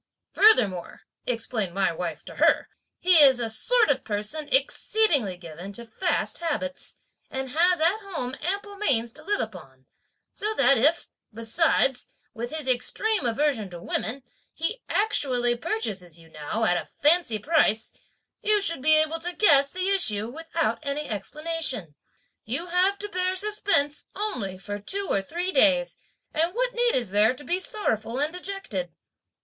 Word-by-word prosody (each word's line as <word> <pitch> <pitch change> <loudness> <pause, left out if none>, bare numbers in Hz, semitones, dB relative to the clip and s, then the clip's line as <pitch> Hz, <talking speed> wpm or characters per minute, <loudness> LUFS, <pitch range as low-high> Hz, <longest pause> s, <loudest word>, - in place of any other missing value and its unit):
'Furthermore,' 210 - +3 0.3
(explained 225 -6 -2
my 195 -1 +1
wife 165 -1 -5
to - - -11
her), - - +3 0.3
'he 360 -1 +5
is 265 -3 +7
a 230 -2 -1
sort 450 - +2
of 265 -1 -1
person 215 +9 -3
exceedingly 330 - +1
given 175 +2 -9
to 235 +4 -7
fast 340 +11 -2
habits, 290 -5 -4 0.3
and 265 -1 -5
has 350 +4 +3
at 340 +7 +2
home 330 - -4
ample 400 +4 -3
means 235 - +2
to 310 - -11
live 410 +5 -1
upon, 135 -11 -7 0.5
so 430 +1 -3
that 275 - +5
if, 305 +8 +3 0.2
besides, 245 +3 +1 0.3
with 235 0 -5
his 310 -2 -3
extreme 265 - 0
aversion 235 -4 0
to 175 -1 -9
women, 245 +9 -3 0.3
he 425 +10 -3
actually 255 - +2
purchases 200 -8 -4
you 165 -1 -17
now, 155 +9 -4
at 175 -5 +2
a - - -13
fancy 300 -6 +1
price, 225 -4 +1 0.5
you 420 0 +3
should 335 -8 0
be 310 +3 +5
able 310 +1 +2
to 350 +2 -3
guess 280 -9 +5
the 370 +4 -1
issue, 220 - +2
without 325 +5 -2
any 290 0 -3
explanation. 255 - -4 0.5
You 265 +10 -2
have 365 +3 +2
to 415 - -6
bear 370 -1 -1
suspense 395 -7 +1
only 250 - -3
for 205 +2 -6
two 390 - -2
or 195 - +2
three 350 - -3
days, 270 -4 +3 0.4
and 335 +5 0
what - - 0
need 480 0 +1
is 240 -7 0
there 215 +4 +4
to 290 - -12
be 350 +4 -1
sorrowful 235 - -2
and 300 +3 -1
dejected?' 360 - -3
280 Hz, 155 wpm, -25 LUFS, 220-360 Hz, 0.5 s, is